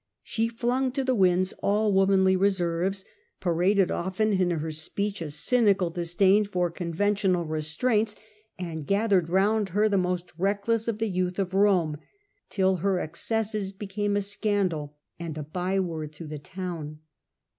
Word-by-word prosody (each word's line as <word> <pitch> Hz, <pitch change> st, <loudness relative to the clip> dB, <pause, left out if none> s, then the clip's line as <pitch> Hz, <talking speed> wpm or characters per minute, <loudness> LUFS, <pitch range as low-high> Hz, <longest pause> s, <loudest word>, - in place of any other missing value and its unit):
She 225 Hz, 0 st, -1 dB
flung 245 Hz, +3 st, 0 dB
to 270 Hz, -, -1 dB
the 260 Hz, 0 st, +1 dB
winds 185 Hz, -3 st, +3 dB
all 210 Hz, +1 st, +2 dB
womanly 190 Hz, -1 st, +4 dB
reserves, 190 Hz, 0 st, 0 dB, 0.3 s
paraded 185 Hz, +2 st, +2 dB
often 195 Hz, +4 st, 0 dB
in 185 Hz, -2 st, +2 dB
her 160 Hz, -2 st, -2 dB
speech 195 Hz, +6 st, -3 dB
a 160 Hz, -, -4 dB
cynical 195 Hz, +1 st, +2 dB
disdain 180 Hz, +4 st, +3 dB
for 180 Hz, -3 st, -1 dB
conventional 180 Hz, +1 st, 0 dB
re 155 Hz, 0 st, -2 dB
straints, 210 Hz, +7 st, 0 dB, 0.4 s
and 160 Hz, -5 st, -5 dB
gathered 200 Hz, -4 st, +2 dB
round 200 Hz, +3 st, +2 dB
her 210 Hz, +4 st, +2 dB
the 200 Hz, -2 st, +2 dB
most 180 Hz, -1 st, -2 dB
reckless 205 Hz, +4 st, 0 dB
of 230 Hz, -2 st, -1 dB
the 225 Hz, -, -1 dB
youth 185 Hz, -2 st, -1 dB
of 190 Hz, -2 st, -2 dB
Rome, 190 Hz, -6 st, +3 dB, 0.5 s
till 190 Hz, -1 st, +2 dB
her 190 Hz, +1 st, 0 dB
excesses 210 Hz, +4 st, -1 dB
became 205 Hz, +1 st, -2 dB
a -, -, +1 dB
scandal 195 Hz, -8 st, -1 dB, 0.2 s
and 165 Hz, -2 st, -5 dB
a 155 Hz, -, -4 dB
byword 175 Hz, -1 st, -2 dB
through 155 Hz, 0 st, -9 dB
the 150 Hz, -1 st, -6 dB
town. 160 Hz, -2 st, -6 dB
190 Hz, 150 wpm, -26 LUFS, 170-205 Hz, 0.5 s, womanly